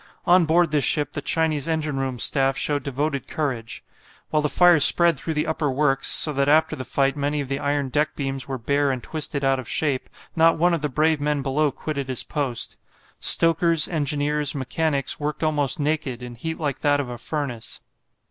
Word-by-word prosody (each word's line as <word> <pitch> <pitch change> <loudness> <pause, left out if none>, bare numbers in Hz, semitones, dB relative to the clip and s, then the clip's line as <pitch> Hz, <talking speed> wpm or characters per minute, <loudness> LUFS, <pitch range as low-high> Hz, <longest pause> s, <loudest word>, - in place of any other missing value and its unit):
On 175 0 +4
board 165 +1 +2
this 150 -2 +1
ship 145 +2 +1
the 145 - -4
Chinese 155 -1 -1
engine 155 -3 -2
room 135 -2 -3
staff 135 +2 +2
showed 145 -1 0
devoted 140 0 -3
courage. 125 -7 -4 0.5
While 155 - +2
the 150 - -1
fire 175 0 +5
spread 170 +3 +6
through 160 +2 -4
the 150 - 0
upper 155 -2 -2
works, 135 0 +1
so 150 - +4
that 140 +1 0
after 160 +2 +3
the 130 - -6
fight 135 +3 0
many 145 +1 -2
of 140 -2 -5
the 135 0 -2
iron 145 -1 -1
deck 150 +4 -1
beams 135 -2 -4
were 135 -1 -4
bare 140 +4 0
and 130 -2 -3
twisted 150 -3 -3
out 135 0 +1
of 125 - -8
shape, 140 -5 -1 0.3
not 165 0 +4
one 175 +2 +2
of 165 - -1
the 150 - -2
brave 155 +2 +1
men 145 -1 -1
below 145 +3 +1
quitted 140 0 -5
his 130 -2 -2
post. 135 -7 -4 0.4
Stokers, 165 -2 +4
engineers, 150 -1 0
mechanics 140 +2 -1
worked 150 +2 -4
almost 150 0 0
naked, 145 -5 -2
in 120 -1 -8
heat 160 +7 -6
like 145 -4 -3
that 145 -1 +1
of 140 - -3
a 120 -1 -8
furnace. 135 -5 -4
145 Hz, 200 wpm, -23 LUFS, 135-155 Hz, 0.5 s, spread